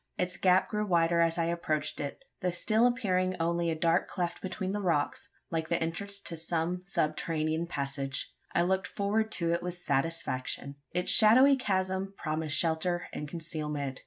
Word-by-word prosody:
Its 180 0 -1
gap 185 0 +3
grew 210 -1 -1
wider 170 -3 +3
as 165 0 +4
I 165 - +1
approached 165 -3 -1
it 140 -1 -5 0.2
though 180 - +1
still 215 +7 +3
appearing 185 -7 0
only 170 +1 +1
a 165 - 0
dark 165 +1 +2
cleft 175 -2 -3
between 190 0 -3
the 205 +1 -2
rocks, 165 -6 0 0.2
like 160 -1 -2
the 170 - +1
entrance 200 +5 -3
to 170 - -2
some 165 +2 -1
subterranean 155 -2 0
passage. 140 -2 -3 0.2
I 170 - +2
looked 190 +2 +1
forward 215 +2 0
to 170 -1 0
it 170 - 0
with 180 0 -4
satisfaction. 140 -3 -2
Its 180 - +1
shadowy 255 +6 +7
chasm 190 -4 -1
promised 155 -1 -1
shelter 170 +1 0
and 150 - -4
concealment. 150 -4 -4
170 Hz, 165 wpm, -30 LUFS, 160-190 Hz, 0.2 s, shadowy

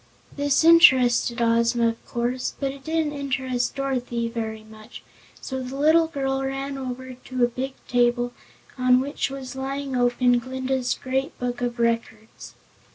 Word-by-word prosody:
This 285 +1 +2
interested 260 -8 +5
Ozma, 230 0 +3
of 230 - -8
course, 245 +2 -2
but 275 -1 -1
it 275 0 -12
didn't 320 -1 -1
interest 265 -3 -2
Dorothy 250 -4 -2
very 220 -2 -5
much, 220 +2 -13 0.4
so 265 -1 -5
the 255 +1 -6
little 315 +3 +4
girl 270 -3 -2
ran 270 +1 -3
over 260 -1 -6
to 255 0 -3
a - - +5
big 260 +3 -5
table 245 0 +1 0.5
on 255 0 +5
which 275 +1 -2
was 265 -2 -7
lying 270 0 -4
open 245 0 +3
Glinda's 260 0 -2
Great 265 +1 -3
Book 245 0 -3
of 240 0 -2
Records. 230 -1 -3
255 Hz, 150 wpm, -24 LUFS, 240-270 Hz, 0.5 s, interested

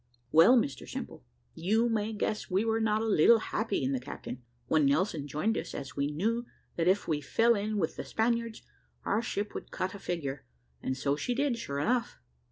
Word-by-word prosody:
Well, 170 +11 +7
Mr 140 - -1
Simple, - - -6 0.3
you 220 +7 +1
may 220 -2 0
guess 215 0 -2
we 195 +4 +1
were 225 0 +1
not 220 0 +1
a - - -1
little 220 +2 +6
happy 220 -6 -2
in 130 - 0
the 135 - 0
Captain, 125 0 -7 0.2
when 155 -3 +3
Nelson 150 0 +1
joined 155 +11 0
us, - - -7
as 135 -3 -6
we 140 - 0
knew 225 +10 -1 0.3
that 170 0 0
if 190 +3 +3
we 150 -2 0
fell 230 - +3
in 210 0 -1
with 165 -5 -1
the - - -3
Spaniards, 230 0 -1 0.4
our 210 - +1
ship 210 -2 -3
would - - -7
cut 185 0 -3
a 200 - -8
figure 145 -7 -4 0.4
and 130 - -2
so 140 +1 +1
she 245 +11 -2
did, 270 -3 0
sure 140 -11 -4
enough. 240 - 0
205 Hz, 200 wpm, -30 LUFS, 150-225 Hz, 0.4 s, Well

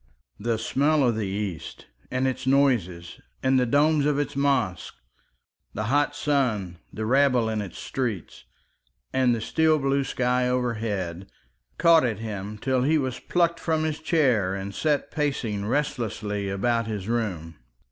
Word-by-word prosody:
The 115 +2 -1
smell 140 +5 +2
of 120 - +1
the 110 -2 -2
East 95 -3 -5 0.2
and 130 +1 0
its 130 0 -3
noises 115 -12 +1 0.2
and 130 0 +3
the 125 - +1
domes 145 +3 +3
of 150 -1 +1
its 145 0 -2
mosques, 135 - 0 0.8
the 110 - -2
hot 145 0 +2
sun, 115 - 0
the 110 - -4
rabble 130 -1 +3
in 110 -1 -1
its 100 -4 -8
streets, 110 - -4 0.7
and 130 -2 +3
the - - -3
steel 160 +6 +2
blue 140 -1 +1
sky 125 -1 0
overhead, 110 -8 -2 0.5
caught 165 -2 +5
at 115 -5 0
him 105 -1 -6
till 130 +3 0
he 155 +5 +3
was 130 -4 -2
plucked 170 +4 +1
from 160 -1 0
his 155 -1 -2
chair 130 - +2
and 100 0 -5
set 150 +3 0
pacing 120 -9 -2
restlessly 105 -7 -2
about 115 +4 0
his 105 -3 -4
room. 90 -9 -3
125 Hz, 150 wpm, -25 LUFS, 105-140 Hz, 0.8 s, caught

